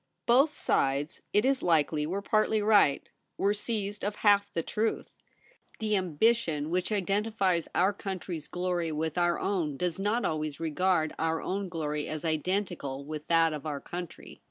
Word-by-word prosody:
Both 275 +6 +4
sides, 140 +3 0
it 210 +4 +3
is 270 0 +2
likely, 155 -2 +2
were 195 +4 -3
partly 215 +1 +2
right; 205 -9 +4 0.3
were 200 +1 +2
seized 210 -1 -3
of 205 +1 -1
half 205 -1 +3
the 165 - -2
truth. 220 +6 -2 0.6
The 215 -2 0
ambition 175 -3 +1
which 180 +3 0
identifies 195 -3 0
our 190 +3 +3
country's 185 -5 -5
glory 175 -2 -2
with 155 0 -2
our 175 0 +2
own 165 -8 -1
does 180 +2 -1
not 210 +5 0
always 155 -2 -2
regard 165 0 +1
our 160 0 0
own 195 0 -3
glory 150 -3 -3
as 155 +1 -5
identical 160 -4 -2
with 150 0 -6
that 165 -1 +4
of 150 +1 -5
our 145 -2 -3
country. 175 +2 -8
180 Hz, 155 wpm, -29 LUFS, 155-205 Hz, 0.6 s, Both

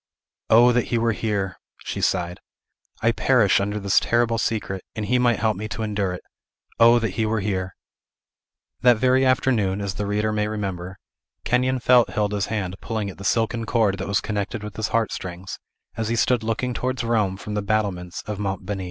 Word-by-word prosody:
"O 120 +2 +7
that 120 0 +1
he 120 - -1
were 115 0 +2
here!" 100 -4 -2 0.3
she - - -4
sighed; 90 -1 0 0.6
"I 115 - +4
perish 115 -4 +3
under 105 +1 -2
this 100 -1 +3
terrible 115 -1 +1
secret; 100 -5 -2
and 110 - -3
he 125 +5 +2
might 120 -3 +3
help 110 -1 +1
me 110 +3 -5
to 110 +1 -4
endure 100 -3 -1
it. 90 - -8 0.6
O 115 +1 +7
that 110 -4 -1
he 110 +4 -1
were 110 0 0
here!" 95 -2 -2 1.1
That 120 -1 +5
very 130 +3 +3
afternoon, 115 -7 +2
as 100 -2 -3
the 105 +1 -3
reader 105 +1 0
may 105 0 0
remember, 95 -3 -4 0.5
Kenyon 130 +2 +1
felt 125 -1 +5
Hilda's 105 -2 0
hand 95 -4 -3
pulling 110 -3 -3
at 95 - -16
the - - -8
silken 115 +2 0
cord 105 -5 +1
that 95 - -4
was 100 -1 +1
connected 105 +1 -3
with 105 -1 -7
his 110 +1 -1
heart 115 -2 0
strings, 90 0 -6 0.4
as 110 -1 -2
he 115 - +1
stood 120 +1 +2
looking 115 +3 -2
towards 130 +1 -2
Rome 105 -5 +1
from 105 +2 -7
the 105 - -1
battlements 100 -4 -2
of 105 -1 -5
Monte 95 -2 -3
Beni. 100 0 -3
105 Hz, 195 wpm, -23 LUFS, 100-115 Hz, 1.1 s, O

